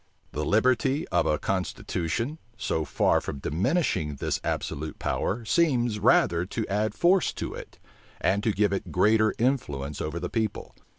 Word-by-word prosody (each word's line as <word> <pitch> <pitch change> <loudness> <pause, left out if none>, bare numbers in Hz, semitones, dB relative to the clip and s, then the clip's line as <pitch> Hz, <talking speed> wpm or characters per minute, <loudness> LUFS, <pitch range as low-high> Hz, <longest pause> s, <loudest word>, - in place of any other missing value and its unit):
The 75 +4 -3
liberty 130 - +2
of 90 -2 +2
a 75 - +2
constitution, 95 - -2 0.2
so 80 -1 -1
far - - +2
from - - -5
diminishing 90 - 0
this - - -2
absolute 75 +2 -3
power, 115 +3 -2
seems 120 -4 +2
rather 85 -3 +4
to 105 +4 -4
add 105 +2 -1
force 180 +1 +3
to - - -5
it, - - -10 0.4
and 100 +2 +1
to 115 - +2
give 105 -1 +1
it 100 - -3
greater 110 +3 +3
influence 75 - -1
over 80 +2 -3
the - - -3
people. 110 -3 -3
105 Hz, 155 wpm, -27 LUFS, 85-120 Hz, 0.4 s, rather